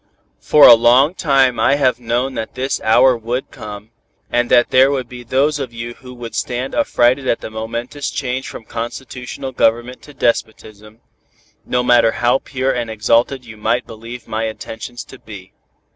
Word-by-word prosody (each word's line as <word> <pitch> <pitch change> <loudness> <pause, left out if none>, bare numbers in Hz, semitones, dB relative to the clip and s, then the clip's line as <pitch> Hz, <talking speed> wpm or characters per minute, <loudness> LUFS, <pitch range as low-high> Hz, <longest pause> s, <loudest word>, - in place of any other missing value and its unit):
"For 150 - +6
a - - +11
long 120 +7 +4
time 135 -8 +2
I 140 - +3
have 130 -4 +1
known 120 +3 -1
that 110 -2 -6
this 130 +2 -2
hour 125 +3 +4
would 120 +3 -4
come, 105 +1 -10 0.4
and 120 0 +1
that 120 - +4
there 130 +1 +5
would 135 -3 -2
be 125 -1 -10
those 140 +5 +1
of 130 -4 -5
you 115 +1 -6
who 125 +1 -13
would 120 -2 -8
stand 125 +2 -3
affrighted 130 - +2
at 115 - 0
the - - -7
momentous 115 +6 -5
change 130 -1 -3
from 110 - -9
constitutional 125 +3 -6
government 120 0 0
to 145 - -15
despotism, 110 -3 -3 0.7
no 125 0 0
matter 120 -2 +4
how 120 +2 +1
pure 135 -1 -2
and 120 -3 -3
exalted 115 +4 +1
you 110 -2 -12
might 115 +3 0
believe 115 +2 -10
my 110 +1 -2
intentions 110 +2 -7
to 135 - -14
be. 100 -4 -12
120 Hz, 175 wpm, -18 LUFS, 115-130 Hz, 0.7 s, a